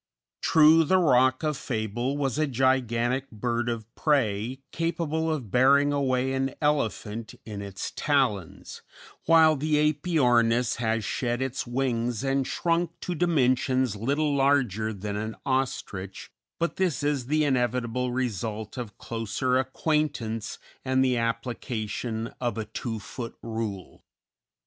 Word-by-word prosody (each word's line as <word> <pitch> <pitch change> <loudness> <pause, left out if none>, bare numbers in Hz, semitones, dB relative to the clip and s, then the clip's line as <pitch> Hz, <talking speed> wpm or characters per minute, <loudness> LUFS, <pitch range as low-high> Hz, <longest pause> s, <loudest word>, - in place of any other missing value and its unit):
True, 160 +1 +6
the 185 +5 +3
Roc 130 -5 +3
of 155 -1 0
fable 120 +2 -2
was 135 -1 -1
a 155 - +2
gigantic 130 0 +1
bird 120 +2 -2
of 115 -2 -3
prey 130 -3 0
capable 165 -1 -1
of 130 -10 -4
bearing 140 +4 +4
away 130 -2 +1
an 135 0 -1
elephant 115 -6 -1
in 105 -2 -6
its 100 -1 -5
talons, 125 - -1 0.5
while 160 -1 +6
the 150 +1 +2
Æpyornis 125 -7 +2
has 110 -2 0
shed 120 -1 -1
its 130 -1 -3
wings 120 -2 -1
and 135 -1 0
shrunk 170 0 -1
to 180 - -3
dimensions 130 - +2
little 140 +7 0
larger 135 -7 +2
than 100 0 -5
an 110 +2 -4
ostrich, 115 -8 -3 0.3
but 170 - -2
this 175 -7 0
is 145 -4 0
the 155 +2 +2
inevitable 125 -2 0
result 110 -3 -3
of 110 -5 -7
closer 120 +3 -1
acquaintance 130 -5 -1 0.3
and 130 0 +2
the 130 -1 +2
application 115 -1 -3
of 120 -2 -1
a 110 - -2
two 115 +1 -4
foot 115 +3 -7
rule. 110 -5 -5
125 Hz, 130 wpm, -27 LUFS, 115-145 Hz, 0.5 s, True